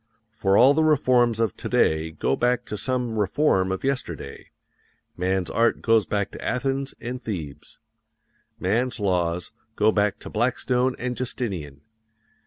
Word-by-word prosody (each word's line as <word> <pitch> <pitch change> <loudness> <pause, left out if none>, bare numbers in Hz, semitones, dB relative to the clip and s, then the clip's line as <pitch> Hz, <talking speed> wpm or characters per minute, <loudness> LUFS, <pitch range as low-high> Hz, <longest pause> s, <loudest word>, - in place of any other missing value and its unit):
For 100 -3 +1
all 130 +3 +7
the 160 +2 +2
reforms 125 -6 +3
of 115 -4 0
to - - -6
day 80 +1 +2
go 80 -4 -1
back 125 0 +1
to - - -5
some 125 -1 -2
reform 95 -3 +2
of 95 - -3
yesterday. 130 - -4 0.7
Man's 90 -1 -1
art 115 +1 +1
goes 115 -2 +3
back 100 -1 -1
to - - -9
Athens 135 +1 -2
and 125 +1 -5
Thebes. 85 - -7 0.8
Man's 115 +7 0
laws 90 -3 -1 0.2
go 110 +1 +3
back 105 -1 +1
to - - -8
Blackstone 125 +2 0
and 125 0 -3
Justinian. 95 - -4
115 Hz, 145 wpm, -24 LUFS, 95-125 Hz, 0.8 s, all